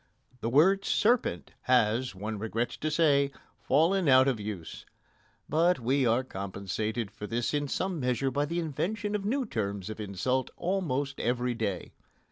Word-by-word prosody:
The 115 - -2
word 185 +10 +4
"serpent" 220 - +1
has, 125 -2 +2
one 105 +2 -4
regrets 115 +2 -2
to 155 - -2
say, 145 -3 +3 0.3
fallen 170 +6 +2
out 130 0 +7
of 130 -5 +1
use. 100 -6 -6 0.6
But 170 +2 +3
we 130 +2 +2
are 115 +3 +2
compensated 100 +1 -4
for 105 - -7
this 115 +4 -1
in 145 -1 0
some 185 +4 -2
measure 125 0 0
by 145 +2 0
the 170 +3 -3
invention 200 +7 -2
of 205 -1 -2
new 260 +5 0
terms 100 - -3
of 110 - -8
insult 110 +6 -1
almost 145 -7 -1
every 125 +1 0
day. 105 -6 -3
130 Hz, 155 wpm, -29 LUFS, 110-160 Hz, 0.6 s, out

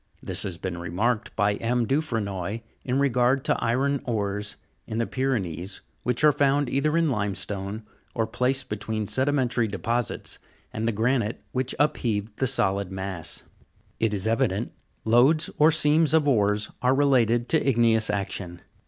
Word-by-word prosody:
This - - -1
has 95 -4 -4
been 90 0 -5
remarked 105 +8 -1
by 105 0 +1
M. 120 +1 0
Dufrenoy 110 - -2 0.2
in 130 0 -1
regard 130 -1 +2
to - - +1
iron 135 +4 +1
ores 105 -3 -2 0.3
in 110 - -4
the 115 - +1
Py 130 - -5
renees, 95 - -2 0.2
which 125 +4 -1
are 150 - +7
found 145 0 +2
either 150 +4 +1
in 165 -3 +2
limestone, 100 -1 -3 0.3
or 115 - +1
placed 125 +4 0
between 105 +1 -3
sedimentary 130 -1 +1
deposits 115 +4 -3 0.3
and 110 +1 -2
the - - +2
granite 115 +1 0
which 130 0 -2
upheaved 115 -8 0
the 130 - +1
solid 100 -6 0
mass. 95 -3 -5 0.6
It 110 -1 +1
is 105 0 0
evident, 115 -2 0 0.3
lodes 130 +8 +4
or 155 +1 +7
seams 155 0 +4
of 155 -2 +3
ores 105 -5 +2
are 125 +1 +3
related 120 -4 +3
to 160 - +3
igneous 115 -3 +3
action. 95 -3 -4
115 Hz, 155 wpm, -25 LUFS, 105-135 Hz, 0.6 s, are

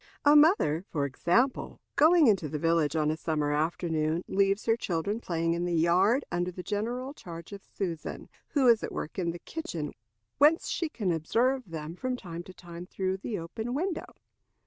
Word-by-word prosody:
A 290 +1 +7
mother, 295 - +5
for 145 -3 0
example, 205 - 0 0.2
going 320 +2 +6
into 195 - +3
the 150 - -3
village 165 0 +1
on 155 -1 +2
a - - -1
summer 150 -2 -1
afternoon, 160 +1 0
leaves 195 +1 +1
her 225 - +3
children 200 0 -2
playing 165 -5 -1
in 170 +1 -2
the 175 -1 0
yard, 185 - +3
under 175 +1 0
the 180 0 -7
general 240 +7 -3
charge 170 - -10
of 200 - -9
Susan, 170 -5 -5 0.2
who 275 -4 +2
is 230 -2 +6
at - - -4
work 155 - -5
in 175 -2 0
the 170 - -4
kitchen, 170 - -5 0.5
whence 310 +3 +4
she 330 - -1
can 210 - -1
observe 235 - 0
them 160 0 -6
from 255 +5 -3
time 170 -6 -7
to 185 +1 -12
time 175 0 -10
through 190 0 -2
the 210 +3 -4
open 220 +9 -5
window. 345 +3 -3
180 Hz, 185 wpm, -29 LUFS, 165-240 Hz, 0.5 s, A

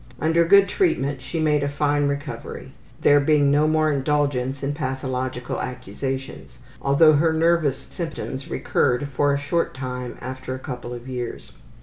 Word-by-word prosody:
Under 165 +2 +3
good 200 +3 +6
treatment 145 - 0
she 165 +6 -4
made 150 -2 +2
a 140 - 0
fine 145 0 +1
recovery; 140 +1 -5 0.3
there 145 0 +6
being 145 -1 +3
no 150 +2 +4
more 155 0 +2
indulgence 140 -2 0
in 140 +1 -1
pathological 130 -3 -3
accusations, 130 - -5 0.2
although 155 +3 +5
her 160 +3 +3
nervous 160 -3 +2
symptoms 145 -3 -6
recurred 125 +3 0
for 145 +1 +1
a 140 - +1
short 145 +3 -1
time 125 -2 -5
after 130 0 -6
a - - -5
couple 125 -2 -7
of 120 +1 -8
years. 125 -2 -5
140 Hz, 150 wpm, -23 LUFS, 130-155 Hz, 0.3 s, good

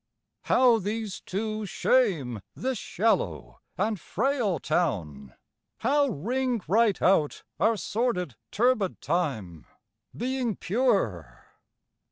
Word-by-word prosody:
How 245 -3 +5
these 210 0 -3
two 215 +2 -3
shame 180 - +1
this 260 -3 -2
shallow 85 - -1 0.2
and 210 +1 0
frail 235 - 0
town! 90 - -2 0.5
How 285 +4 +3
ring 245 - -1
right 215 +3 +3
out 170 -6 +2 0.2
our 225 0 +3
sordid 200 - -1
turbid 220 -4 +1
time, 130 - -2 0.5
Being 250 -2 -1
pure! 190 - -1
205 Hz, 95 wpm, -27 LUFS, 150-235 Hz, 0.5 s, How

